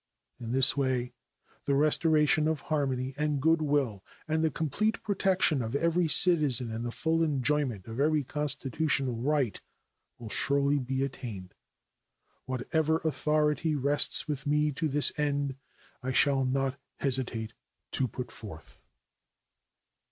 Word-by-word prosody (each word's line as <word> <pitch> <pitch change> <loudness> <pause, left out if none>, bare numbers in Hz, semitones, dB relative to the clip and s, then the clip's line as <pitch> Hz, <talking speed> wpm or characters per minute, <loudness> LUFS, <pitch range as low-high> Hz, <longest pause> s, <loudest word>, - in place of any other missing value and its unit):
In 115 -2 -6
this 135 +1 +5
way 130 -3 -1 0.5
the 140 - +1
restoration 155 +1 +3
of 160 -3 -1
harmony 135 -4 -2
and 150 -1 0
good 160 +3 +2
will 140 -10 -1 0.2
and 160 +1 0
the 160 - +2
complete 165 +9 -2
protection 190 -7 +1
of 115 +2 -4
every 170 +3 +1
citizen 150 - +4
in 110 +1 -5
the 120 0 -4
full 165 +5 -1
enjoyment 140 - 0
of 115 +3 -7
every 150 +1 +2
constitutional 140 -1 -1
right 135 -2 -1 0.6
will 115 -2 -9
surely 140 +1 +2
be 130 +1 -2
attained. 110 -9 -7 0.9
Whatever 155 +5 -1
authority 150 0 0
rests 145 +2 +2
with 145 -2 -4
me 150 +1 +1
to 150 +3 -2
this 145 0 +3
end 145 -2 -1 0.5
I 130 +1 -3
shall 135 0 +2
not 135 +1 -1 0.2
hesitate 125 -5 -1 0.4
to 130 - -1
put 125 +1 -7
forth. 100 -8 -11
140 Hz, 130 wpm, -28 LUFS, 130-150 Hz, 0.9 s, this